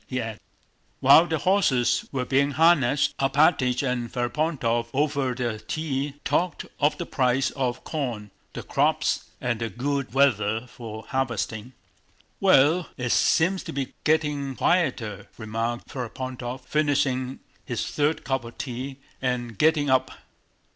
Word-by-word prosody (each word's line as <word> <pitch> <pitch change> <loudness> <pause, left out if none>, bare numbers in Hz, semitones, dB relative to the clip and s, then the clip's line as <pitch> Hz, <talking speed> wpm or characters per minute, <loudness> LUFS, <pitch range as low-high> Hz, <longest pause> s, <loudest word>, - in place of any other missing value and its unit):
he 130 - -2
added. 110 -2 -5 0.6
While 165 +2 +7
the 160 - 0
horses 155 -9 +2
were 130 -2 -2
being 140 +2 +2
harnessed 150 -4 +4
Alpátych 135 -2 +3
and 120 -2 -2
Ferapóntov 120 -2 -1
over 140 -3 0
their 120 -3 -2
tea 140 +3 -3
talked 175 -3 0
of 145 +1 +2
the 170 - -4
price 130 -2 +1
of 125 -3 -2
corn, 120 -9 -4 0.2
the - - -6
crops, - - 0
and 120 -2 -2
the 115 - -1
good 140 +5 -2
weather 115 -4 +2
for 110 -3 -9
harvesting. 120 -2 -2 0.7
"Well, 170 -2 +4
it 120 -2 -2
seems 185 +4 +3
to - - -5
be 135 -1 -3
getting 150 -3 0
quieter," 120 - 0
remarked 115 +2 -3
Ferapóntov, 125 0 -5
finishing 135 -3 0 0.2
his 120 -5 -3
third 150 +2 0
cup 135 -2 -1
of 115 0 -11
tea 130 +1 -5 0.2
and 125 -3 -2
getting 150 +3 +3
up. 130 -1 +3
130 Hz, 135 wpm, -25 LUFS, 120-145 Hz, 0.7 s, While